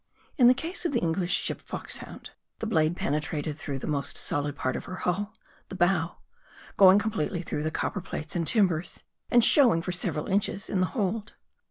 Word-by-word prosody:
In 250 -6 +6
the 250 - +7
case 330 +9 -2
of 340 - -1
the 240 - +2
English 175 +1 -1
ship - - -4
Foxhound, - - -7 0.3
the - - -4
blade 160 -6 +2
pen 140 - -1
etrated 150 0 -2
through 140 -2 -5
the - - -6
most 140 -2 -2
solid 145 0 -1
part 130 -2 -2
of - - -5
her 185 - -6
hull, 200 +4 -2 0.3
the - - -7
bow; 175 -2 +1 0.6
going 190 0 +8
completely 205 -5 -1
through 150 - -3
the 155 - -1
copper 195 +5 -3
plates 155 -3 -6
and 170 -2 0
timbers, 180 -6 +1 0.3
and 240 -2 +6
showing 240 - +5
for 180 - -3
several 170 -4 -2
inches 200 0 -1
in 195 - +1
the 185 - +2
hold. 210 +1 -2
180 Hz, 195 wpm, -27 LUFS, 155-210 Hz, 0.6 s, going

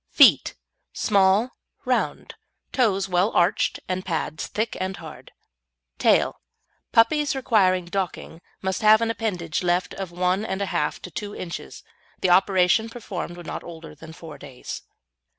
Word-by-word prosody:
FEET - - +5 0.4
Small, 200 +3 +3 0.3
round; - - -1 0.4
toes 200 -7 +1
well 180 +2 +2
arched 175 +3 +2
and 185 0 -2
pads 160 -3 -3
thick 220 +2 -2
and 190 +1 -3
hard. 160 -2 -11 0.7
TAIL - - +3 0.5
Puppies 285 +6 +3
requiring 190 -8 +2
docking 175 -2 -4 0.2
must 190 -1 -1
have 215 +1 +6
an 230 0 +1
appendage 180 -8 -2
left 180 0 0
of 195 -2 -5
one 180 +3 0
and 190 -3 -3
a 200 - 0
half 150 -4 -1
to 180 - -8
two 205 +5 -6
inches 170 -2 -7 0.3
and - - -39
the 185 - +3
operation 190 +3 +4
performed 190 -7 -6
when 175 - -10
not - - -5
older 165 -2 -10
than 160 +2 -12
four 160 -2 -11
days. 135 -3 -8
185 Hz, 150 wpm, -24 LUFS, 175-210 Hz, 0.7 s, have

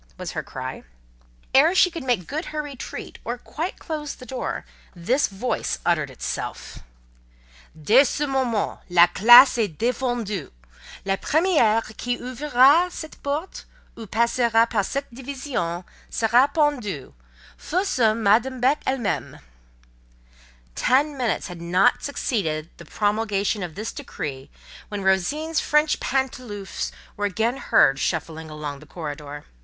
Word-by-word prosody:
was - - -5
her - - -3
cry. - - -7 0.7
Ere 310 +7 +5
she 365 -1 +5
could 330 -4 -6
make 240 -9 0
good 310 - -4
her 305 -1 -4
retreat, 280 -4 -8
or 240 +2 -3
quite 325 +8 -5
close 300 -3 -5
the 255 - -12
door, 260 0 -4 0.3
this 240 +12 +1
voice 205 +6 -2
uttered - - +1
itself:— - - -6 1.0
"Dès 240 - +5
ce - - -3
moment!—la 230 -9 +2
classe 240 +8 +7
est 200 -9 -1
défendue. 235 - -2 0.6
La 195 0 0
première 290 - +2
qui 245 0 -2
ouvrira 280 +6 +3
cette 315 -3 -9
porte, 295 +6 -4 0.3
ou 225 -2 -9
passera 230 +1 +3
par 220 -4 0
cette 275 +4 -4
division, 250 - -4 0.3
sera 235 +4 +3
pendue—fut 210 - -3
ce 235 - +3
Madame 230 +4 +2
Beck 265 +5 +2
elle 265 - +1
même!" 225 -6 -3 1.3
Ten 280 - +2
minutes 245 -7 -1
had 175 -2 -8
not 180 +3 +3
succeeded 170 - -2
the 170 - -12
promulgation 205 +2 0
of 175 -3 -5
this 215 +3 -4
decree 145 - -6 0.4
when 205 -2 -4
Rosine's 290 - +1
French 300 +1 +2
pantoufles 250 -7 -3 0.2
were 205 - -2
again 225 +6 0
heard 135 - +3
shuffling 160 0 -3
along 150 -2 -6
the 155 - -15
corridor. 145 -2 -7
235 Hz, 130 wpm, -23 LUFS, 190-275 Hz, 1.3 s, classe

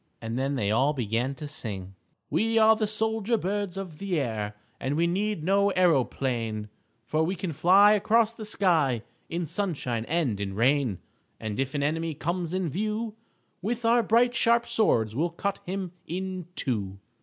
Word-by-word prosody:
And 115 0 -4
then 135 +2 0
they 105 -5 0
all 135 +7 +3
began 120 +1 -1
to 155 - -7
sing: 105 -11 -4 0.4
_We 225 +1 +2
are 220 0 +7
the 215 -1 0
soldier 220 +1 0
birds 200 -1 -2
of 180 -6 -6
the 190 -5 -1
air, 110 -5 -3 0.2
And 135 +2 -1
we 165 +2 +2
need 195 0 -1
no 200 +3 +3
aeroplane, 125 - +1 0.4
For 155 - 0
we 180 +4 -1
can 175 -2 -4
fly 195 +7 +6
across 220 +2 +3
the 225 - -8
sky 160 - +2 0.3
In 170 +1 -2
sunshine 150 - -2
and 145 -10 0
in 95 -1 -3
rain. 125 -2 +2 0.4
And 110 0 -4
if 135 +1 -1
an 140 - 0
enemy 160 +2 -1
comes 170 +2 -2
in 185 -1 -1
view 215 +4 -2 0.5
With 230 +4 -2
our 235 +1 +5
bright 235 +3 +3
sharp 235 -1 +3
swords 110 - +2
we'll 165 +6 +1
cut 195 +4 -3
him 185 -1 -3 0.2
in 185 0 -4
two. 100 -7 -2
170 Hz, 170 wpm, -27 LUFS, 130-205 Hz, 0.5 s, are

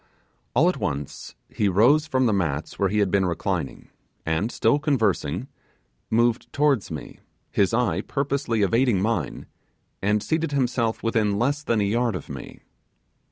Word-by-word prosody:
All 150 +8 +5
at 180 - +1
once 70 -1 -4
he 105 - 0
rose 130 - +4
from 130 -3 +1
the 110 - +2
mats 80 -6 -2
where 100 - +2
he 105 - -1
had 100 -3 +2
been 95 -1 +2
reclining, 85 -2 -3 0.4
and, 80 +8 0
still 145 - +2
conversing, 110 - 0 0.6
moved 120 +1 +1
towards 140 -7 +1
me, 75 -3 -8 0.3
his 100 -2 +2
eye 115 -7 +1
purposely 135 -4 -1
evading 115 0 +2
mine, 100 - -2 0.6
and 105 +1 +1
seated 160 -2 -1
himself 125 -4 0
within 110 -3 +1
less 140 +6 0
than 115 -7 0
a - - +2
yard 115 +2 +1
of 90 - -7
me. - - -9
115 Hz, 155 wpm, -24 LUFS, 100-130 Hz, 0.6 s, All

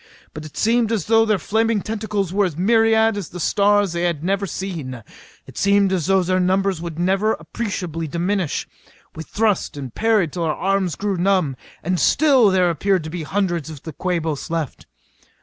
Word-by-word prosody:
But 155 0 -8
it 155 - -11
seemed 230 0 +2
as 215 -7 -1
though 225 0 +4
their 215 -2 +3
flailing 220 +3 0
tentacles 210 -4 -3
were 205 0 +3
as 165 -5 -4
myriad 225 +2 +3
as 195 -5 -5
the 180 - -8
stars 205 +1 +2
they 170 - -2
had 170 -4 -1
never 195 +2 0
seen. 155 - -5 0.4
It - - -9
seemed 200 -1 +3
as 175 -5 -1
though 190 -1 +3
their 185 +1 +1
numbers 190 -1 +1
would 170 -2 -6
never 195 +5 +1
appreciably 165 -2 -4
diminish. 175 +1 -1 0.5
We 160 - -6
thrust 205 -2 -1
and 135 -4 -7
parried 215 -8 +1
till 175 - -4
our 155 - 0
arms 190 -4 0
grew 200 -2 -2
numb. 180 -6 +1 0.3
And 180 +1 0
still 270 -8 +4
there 185 -2 +3
appeared 185 +2 0
to 155 - -6
be 175 0 -4
hundreds 175 -2 -1
of 150 -4 -10
the 160 - -7
Quabos 165 -3 -2
left. 165 -5 -4
190 Hz, 185 wpm, -21 LUFS, 165-205 Hz, 0.5 s, though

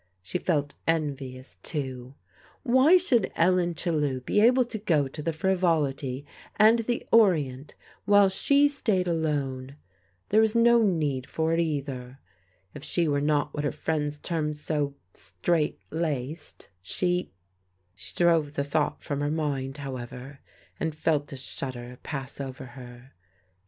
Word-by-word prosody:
She 140 - -3
felt 145 -6 0
envious, 140 -5 -2
too. 130 -3 -5 0.5
Why 265 +7 +6
should 250 - +1
Ellen 175 0 +2
Chellew 150 -6 -1
be 205 +11 +1
able 250 +3 +5
to 230 -2 -6
go 160 -9 +2
to 150 +3 -8
the 165 - -1
Frivolity 155 -6 0 0.3
and 220 +2 +6
the 235 +1 -2
Orient, 150 - +3 0.3
while 205 -1 +6
she 280 +9 +3
stayed 220 -10 0
alone? 140 -5 -2 0.5
There 215 +2 +5
was 220 0 +2
no 235 0 +5
need 150 - 0
for 160 0 0
it 165 - +1
either. 135 -5 -3 0.6
If 140 - -9
she 170 +1 0
were 145 -1 +1
not 150 0 +1
what 150 - -3
her 145 - 0
friends 150 -2 -2
termed 150 -1 -2
so 150 -2 -1 0.2
straight 150 - -1
laced, 155 -2 -4
she 180 - -1 0.6
She 95 -1 -10
drove 165 -4 +3
the 140 - -1
thought 145 +1 -1
from 145 -1 -3
her 145 - 0
mind, 145 -3 -2
however, 130 0 -7 0.4
and 160 -2 -2
felt 155 -2 0
a 135 - -6
shudder 125 -2 -6
pass 135 -1 -6
over 135 0 -6
her. 125 0 -12
150 Hz, 140 wpm, -27 LUFS, 135-175 Hz, 0.6 s, Why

